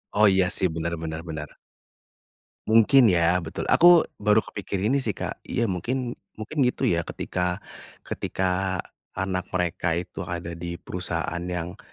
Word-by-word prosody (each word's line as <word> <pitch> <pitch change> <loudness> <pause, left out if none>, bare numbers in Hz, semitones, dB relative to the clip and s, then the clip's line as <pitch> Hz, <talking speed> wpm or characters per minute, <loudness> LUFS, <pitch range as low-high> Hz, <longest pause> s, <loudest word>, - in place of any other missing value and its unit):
Oh 105 +1 +6
iya 95 -1 +3
sih 95 - +2
benar 80 +1 -3
benar 80 -1 -4
benar. 75 -2 -6 1.1
Mungkin 115 +3 +6
ya 90 -2 +3
betul 80 -2 -5
aku 175 -1 +8 0.2
baru 105 +1 +3
kepikir 100 +1 -3
ini 140 - +3
sih, 110 -7 -1
Kak, - - -5
iya 120 - 0
mungkin 120 +7 -2 0.2
mungkin 110 +8 -7
gitu 125 - -2
ya 85 - +3
ketika 90 +1 -3 0.4
ketika 95 0 -1 0.3
anak 95 -1 -2
mereka 85 -2 0
itu 85 +1 -5
ada 85 -1 -4
di 85 +1 -5
perusahaan 90 -1 -3 0.2
yang, 90 +4 -6
90 Hz, 145 wpm, -25 LUFS, 85-105 Hz, 1.1 s, aku